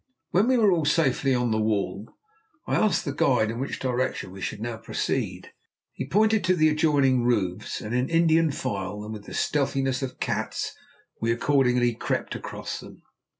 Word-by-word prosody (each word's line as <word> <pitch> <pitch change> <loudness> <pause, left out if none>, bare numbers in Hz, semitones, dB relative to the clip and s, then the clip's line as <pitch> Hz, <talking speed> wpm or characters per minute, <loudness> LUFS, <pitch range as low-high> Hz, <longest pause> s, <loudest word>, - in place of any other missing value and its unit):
When 195 +6 +3
we 260 0 +4
were 215 -4 +5
all 170 -3 +2
safely 135 -3 +2
on 125 -1 0
the 110 - +1
wall, 105 0 -1 0.6
I - - -3
asked 215 - +2
the 140 - -2
guide 120 -6 +2
in 115 - -5
which 135 - -3
direction 130 -6 -2
we 95 0 -10
should - - -4
now 115 0 -4
proceed; - - -3 0.4
he - - -5
pointed 215 +5 +3
to 185 0 +3
the 155 -2 +4
adjoining 145 -5 +3
roofs, 105 -5 -1
and 105 - -5
in 125 +1 +1
Indian 165 -1 +4
file, 105 - -4
and 110 +1 -6
with 105 -2 -9
the - - -8
stealthiness 135 -2 0
of 130 -2 -5
cats, - - -2 0.5
we 115 +1 +1
accordingly 125 -1 +2
crept - - -2
across - - -6
them. - - -13
130 Hz, 180 wpm, -26 LUFS, 115-155 Hz, 0.6 s, were